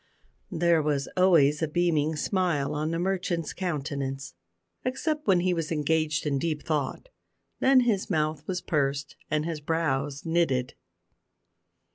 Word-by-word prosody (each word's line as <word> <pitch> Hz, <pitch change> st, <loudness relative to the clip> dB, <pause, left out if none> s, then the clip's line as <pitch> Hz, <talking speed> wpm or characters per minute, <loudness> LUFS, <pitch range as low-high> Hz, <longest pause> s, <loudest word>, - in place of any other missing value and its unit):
There 170 Hz, -1 st, +3 dB
was 145 Hz, -2 st, 0 dB
always 165 Hz, -6 st, +4 dB
a 160 Hz, -, +1 dB
beaming 160 Hz, -1 st, +1 dB
smile 170 Hz, -4 st, 0 dB
on 150 Hz, +1 st, -1 dB
the 165 Hz, -, -1 dB
merchant's 175 Hz, -3 st, -1 dB
countenance, 140 Hz, -, -3 dB, 0.5 s
except 300 Hz, +4 st, -2 dB
when 185 Hz, -3 st, +4 dB
he 180 Hz, 0 st, +2 dB
was 165 Hz, -2 st, -3 dB
engaged 155 Hz, 0 st, 0 dB
in 140 Hz, -2 st, 0 dB
deep 155 Hz, 0 st, -2 dB
thought; 155 Hz, -, -2 dB, 0.5 s
then 265 Hz, -1 st, +5 dB
his 220 Hz, -6 st, 0 dB
mouth 155 Hz, -3 st, 0 dB
was 180 Hz, -1 st, -2 dB
pursed 140 Hz, -2 st, -1 dB
and 155 Hz, 0 st, 0 dB
his 165 Hz, -3 st, -4 dB
brows 145 Hz, -2 st, -1 dB
knitted. 160 Hz, -7 st, +1 dB
160 Hz, 135 wpm, -27 LUFS, 145-175 Hz, 0.5 s, then